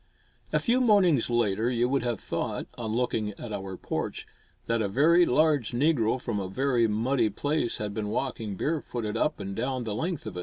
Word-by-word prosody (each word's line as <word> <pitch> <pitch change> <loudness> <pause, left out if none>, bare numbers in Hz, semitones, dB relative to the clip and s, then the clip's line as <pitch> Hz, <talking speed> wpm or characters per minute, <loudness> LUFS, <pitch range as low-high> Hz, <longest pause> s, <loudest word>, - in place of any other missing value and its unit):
A - - +3
few 250 +1 +2
mornings 190 - +4
later 115 -1 +1
you 120 -1 +1
would 135 +1 +1
have 120 -2 -2
thought, - - -3
on 115 -2 -4
looking 110 -3 -1
at 110 +1 -8
our 95 -2 -5
porch, - - -4 0.4
that 115 -1 0
a 105 - +1
very 165 - +4
large 145 -4 +2
negro 130 -3 +2
from 115 -4 -3
a 95 -1 -4
very 125 +1 +2
muddy 115 +2 +1
place 145 +3 -1
had 105 -1 -4
been 105 0 -3
walking 110 -3 -3
bare 155 0 0
footed 110 -4 -4
up - - 0
and 100 0 -5
down 130 +1 -2
the 110 -2 -3
length 165 - -3
of - - -6
it. - - -3
120 Hz, 200 wpm, -27 LUFS, 110-140 Hz, 0.4 s, mornings